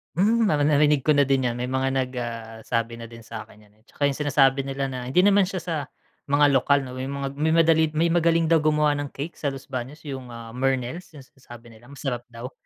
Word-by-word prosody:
Hmm, 225 +6 +3
nari 150 -7 +2
narinig 150 -1 +3
ko 150 - +5
na 145 - +5
din 135 -2 +1
yan, 120 - -2
may 125 +1 -4
mga 130 0 0
nag 130 -1 -1
ah, 115 -1 -6
sabi 115 0 -2
na 115 - -8
din 115 0 -13
sa 110 -1 -8
akin 105 - -19
niyan, 105 0 -24
eh. - - -31
'Tsaka - - -6
yung 135 - -7
sinasabi 140 -2 +3
nila 135 0 -3
na 125 -1 -5
hindi 180 +8 +3
naman 200 -2 +4
siya 185 -3 -4
sa 170 -2 -3 0.5
mga 145 0 +4
lokal 140 +1 +3
'no, 130 0 -8
may 130 - -3
mga 140 0 -4
may 160 +1 +2
madali 165 -1 +4
may 165 +2 +2
magaling 165 -1 +3
daw 165 - +6
gumawa 150 0 +2
ng 145 - -3
cake 145 +5 -7
sa 145 - -2
Los 135 -1 -6
Baños, 130 +5 -6
yung, 135 -4 -6
ah, 115 -1 -9
Mernels 135 +7 -2
yung 140 - -11
sinasabi 120 -3 -15
nila 115 +2 -17
masarap 135 -4 -5
daw. 120 +2 -9
135 Hz, 240 wpm, -24 LUFS, 125-150 Hz, 0.5 s, daw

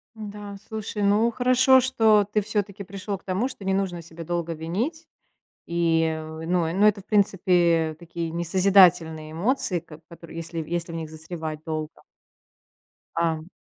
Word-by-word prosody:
М-да, 205 -2 -8
слушай, 215 -1 -5
ну 205 +3 +3
хорошо, 255 +2 +5
что 220 -5 +4
ты 210 - +2
всё-таки 205 -1 -3
пришел 195 +1 -5
к - - -25
тому, 195 +7 -1
что 210 -7 -9
не 190 - +1
нужно 190 -3 -1
себя 165 0 -10
долго 170 0 -2
винить, 225 - -3 0.6
и 165 -2 +1
в, 160 +1 -8
ну, 175 -1 +1
и - - -2
ну 200 +3 +4
это, 210 -1 +3
в 195 - -16
принципе, 175 -6 +2
такие 170 -1 -5
несозидательные 170 -3 +3
эмоции, 185 0 0
как 160 -2 -14
в - - -65
которые 170 -1 -12
если 165 0 -6
если 170 -1 -3
в - - -6
них 160 -1 -5
застревать 160 -1 -6
долго. 155 -1 -3 1.3
Ам 160 -1 0
175 Hz, 165 wpm, -25 LUFS, 165-205 Hz, 1.3 s, хорошо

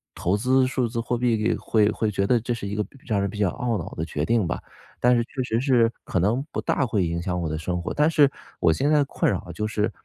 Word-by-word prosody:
投 95 +4 0
资 130 +3 +3
数 130 -1 0
字 115 0 -3
货 120 +1 -1
币 115 -2 +1
会 105 -2 +2
会 110 - -1
觉 100 -1 0
得 120 +3 +3
这 120 +2 -2
是 115 -3 -5
一 100 +1 -3
个 105 - 0
比 - - -19
让 110 -5 0
人 100 0 0
比 105 - -8
较 100 -3 +2
懊 120 +1 -2
恼 90 0 -5
的 80 - -3
决 75 -1 -3
定 110 0 +1
吧， - - -2 0.4
但 125 0 +5
是 120 - +2
确 130 +1 -4
实 115 -2 0
是 120 -3 +3
可 90 - 0
能 105 +9 +2
不 - - -3
大 135 - +1
会 105 -6 0
影 85 0 -2
响 90 0 -2
我 80 - -2
的 80 - -2
生 90 +2 -2
活。 - - -4
但 150 +2 +3
是 145 -4 +4 0.3
我 80 - +5
现 135 - +1
在 150 -1 +4
困 135 - 0
扰 - - -3
就 105 0 -3
是， 110 0 -1
110 Hz, 300 characters per minute, -24 LUFS, 95-125 Hz, 0.4 s, 但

